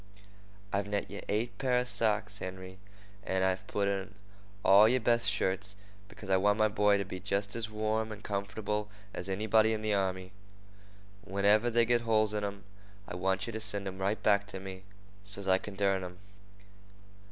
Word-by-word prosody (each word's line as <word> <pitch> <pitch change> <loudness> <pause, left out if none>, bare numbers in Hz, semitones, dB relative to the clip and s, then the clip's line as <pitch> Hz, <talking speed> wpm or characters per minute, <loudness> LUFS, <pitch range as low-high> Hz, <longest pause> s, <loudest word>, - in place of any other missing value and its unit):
"I've 100 +1 0
knet 100 -1 -2
yeh 100 - -6
eight 110 +4 -1
pair 125 -2 +2
of 125 0 0
socks, 105 -3 0
Henry, 95 0 -7 0.4
and 95 -1 0
I've 95 0 -1
put 100 -1 0
in 100 +1 -2 0.5
all 100 +3 +8
yer 130 +2 +3
best 115 0 +2
shirts, 95 +1 -1 0.3
because 105 - -12
I 95 0 +4
want 105 +2 +3
my 110 -1 +3
boy 105 0 +3
to 100 - -2
be 95 0 -6
jest 100 +1 -2
as 115 -2 -3
warm 110 +1 -1
and 105 0 -8
comf'able 105 +1 -3 0.2
as 90 - -5
anybody 110 +3 +3
in 110 0 -3
the 110 -1 +1
army. 95 -1 -1 0.9
Whenever 100 +4 +3
they 120 0 +3
get 120 0 +2
holes 110 -2 +2
in 105 -1 -1
'em, 100 0 -4 0.4
I - - -6
want 95 +1 0
yeh - - -3
to 110 - -3
send 100 -2 -1
'em 95 0 -6
right 100 +3 0
away - - -23
back 100 -1 +3
to 95 -1 -7
me, 95 0 -8 0.4
so's 100 -1 -4
I 95 0 +4
kin 105 0 -8
dern 95 -1 +1
'em. 90 0 -8
100 Hz, 190 wpm, -31 LUFS, 95-110 Hz, 0.9 s, all